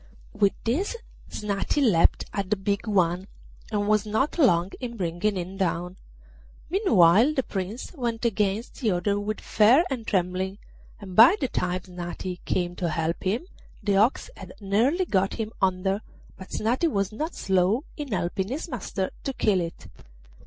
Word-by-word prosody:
With 205 -2 +2
this 325 - 0 0.3
Snati 205 +6 -2
leapt 210 -12 +3
at 200 -2 -2
the 210 - +3
big 200 +3 -2
one, 185 -2 +1 0.4
and 205 -1 0
was 215 -1 +3
not 220 +10 -1
long 185 - +4
in 235 -2 -6
bringing 180 +3 -1
him 185 +2 -5
down. 180 -1 -1 0.8
Meanwhile 235 - +5
the 265 - +1
Prince 200 - -5
went 240 -6 -3
against 210 0 -1
the 230 - +2
other 200 +3 0
with 215 +1 -3
fear 230 +9 +4
and 235 -4 -4
trembling, 185 +1 -1 0.4
and 190 -4 -9
by 235 - +9
the 265 - 0
time 180 -5 -1
Snati 180 0 -6
came 175 -1 -1
to 175 - -1
help 160 +1 -1
him 215 - -1 0.4
the 200 -2 +2
ox 235 - +2
had - - -10
nearly 230 - +1
got 195 - +1
him 220 -1 -4
under, 190 +2 +1 0.3
but 190 - -11
Snati 245 +10 0
was 200 -6 -1
not 310 +10 -4
slow 190 +6 +1
in 290 -4 -6
helping 185 0 -1
his 280 - -4
master 200 - -3
to 270 - -2
kill 200 -7 +2
it. 170 0 -6
200 Hz, 160 wpm, -26 LUFS, 185-235 Hz, 0.8 s, by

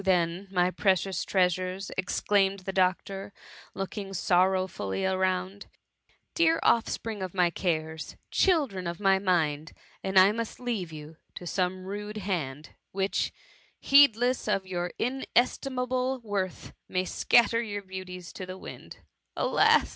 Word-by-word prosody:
then, 180 0 +1
my 180 -1 +2
precious 190 -1 +1
trea 185 -2 +3
sures!" 185 +2 -3
exclaimed 195 +1 +1
the 190 +1 -5
doctor, 195 +1 0 0.4
looking 195 0 -5
sorrow 185 +1 +3
fully 135 - -3
around: 190 +1 -1 0.3
" - - -54 0.3
Dear 330 -1 +3
oflFspring 225 -3 +1
of 185 0 -6
my 175 -2 +3
cares 160 -3 -2
I - - -25
children 275 - +2
of 170 0 -4
my 195 -1 +4
mind! 160 -5 0 0.3
and 190 0 -3 0.2
must 230 -1 -4
I - - -13
leave 210 -9 -2
you 155 0 -10 0.2
to 180 - -8
some 185 +1 -1
rude 205 +2 -5
hand, 155 -8 -3 0.2
which, 195 +1 -1 0.5
heedless 255 -4 +4
of 195 -2 0
your 180 -1 -3
in 265 +3 -2
estimable 255 +1 +1
worth, 200 -4 -3 0.2
may 185 0 0
scatter 230 +4 +3
your 205 -3 -4
beauties 185 -2 -8
to 185 - -7
the 185 0 -7
winds? - - -10 0.4
Alas - - +4
190 Hz, 140 wpm, -28 LUFS, 180-210 Hz, 0.5 s, my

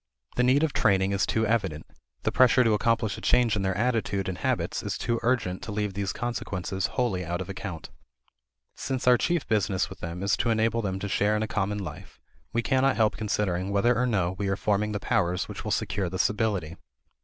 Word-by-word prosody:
The - - +2
need 130 +4 +4
of 160 - +1
training 95 -1 +2
is 100 0 +1
too 110 0 +1
evident; 100 -9 -1 0.4
the - - +1
pressure 130 0 +5
to 115 -2 +3
accomplish 110 +1 +1
a - - -14
change 120 -3 +3
in 100 - -1
their 95 -1 -1
attitude 110 -4 0
and 95 -1 -4
habits - - -1
is - - -3
too 115 -1 -1
urgent 115 -7 0
to 110 - -6
leave 105 -1 -2
these 100 0 -2
consequences 95 -5 -3
wholly 110 -8 0
out 85 0 -3
of 95 - -5
account. 95 -4 -6 0.8
Since 130 -2 -3
our 125 - +8
chief 170 +5 0
business 100 -3 0
with 95 - -10
them 85 +2 -5
is 100 -1 +2
to 115 - 0
enable 115 +1 +2
them 95 -3 -2
to 100 - -4
share 105 +1 +1
in 105 - 0
a - - -2
common 105 0 -1
life 90 -1 -8 0.3
we 120 +1 0
cannot 135 +1 +2
help 110 -2 +2
considering 100 -3 -1
whether 100 +5 +3
or 125 +2 +1
no 95 -7 +1
we 100 - -1
are 95 - +1
forming 105 +1 0
the 105 - -2
powers 90 -6 0
which - - -7
will - - -4
secure 95 -3 -1
this 95 +1 +1
ability. 100 -6 -2
105 Hz, 215 wpm, -27 LUFS, 95-115 Hz, 0.8 s, our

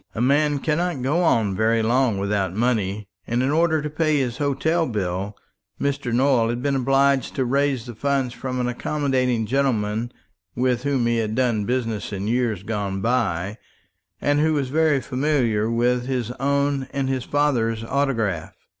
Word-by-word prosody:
A - - -3
man 145 +4 +3
cannot 155 -1 -1
go 150 +7 +1
on 110 - +2
very 110 +2 +2
long 120 -1 +2
without 100 -2 -1
money; 105 -3 0 0.2
and 120 +2 0
in 135 - +1
order 160 -1 +2
to 150 - -2
pay 155 -1 +1
his 125 -2 -2
hotel 160 +4 +1
bill 100 -2 -3 0.4
Mr. 140 -3 -1
Nowell 125 -2 +3
had 120 +1 -3
been 140 -1 +1
obliged 135 0 +2
to 130 - 0
raise 135 -1 +1
the 120 - -7
funds 135 +1 -1
from 130 0 -4
an 125 - 0
accommodating 130 -2 0
gentleman 115 -3 0 0.4
with 125 -1 +1
whom 135 -3 0
he 120 0 +1
had 110 -1 -1
done 120 -5 +1
business 115 -4 -2
in 100 0 -3
years 115 -5 0
gone 100 -3 -3
by, 105 -5 0 0.6
and 145 0 +1
who 155 +1 +2
was 140 -3 -1
very 155 -1 +2
familiar 125 -5 0
with 120 +1 +1
his 125 -3 -2
own 140 0 0
and 135 -1 -1
his 130 -2 -1
father's 120 -6 +1
autograph. 115 - -1
125 Hz, 165 wpm, -23 LUFS, 110-140 Hz, 0.6 s, man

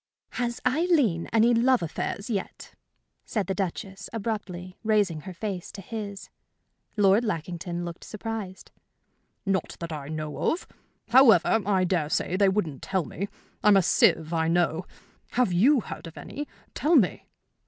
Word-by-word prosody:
"Has 240 -1 -2
Aileen 265 - +2
any 230 +2 +4
love 245 -1 +3
affairs 195 +5 -3
yet?" 205 -5 -4 0.5
said 210 -4 -2
the 190 - -1
Duchess, 195 +1 -4
abruptly, 195 -5 -4
raising 205 -7 +2
her 185 +5 -8
face 190 -2 -4
to - - -8
his. 200 -1 -7 0.7
Lord 200 +2 +5
Lackington 175 -3 -3
looked 170 -1 -7
surprised. 215 -3 -6 0.7
"Not 195 -3 -1
that 170 -1 -5
I 145 -3 -5
know 155 -1 -2
of. 340 - -3 0.4
However, 235 -3 +6
I 190 -3 +3
dare 175 -5 0
say 175 - 0
they 200 0 +4
wouldn't 170 -9 -1
tell 190 -4 -1
me. 200 +4 -4 0.4
I'm 210 -1 +7
a 190 - +4
sieve, 160 0 +3
I 160 -1 +1
know. 170 0 +1 0.5
Have 240 -7 +2
you 245 +9 +5
heard 175 - -8
of 165 - -12
any? 290 +1 -6 0.3
Tell 320 +4 +2
me." 220 - +2
195 Hz, 150 wpm, -27 LUFS, 175-225 Hz, 0.7 s, I'm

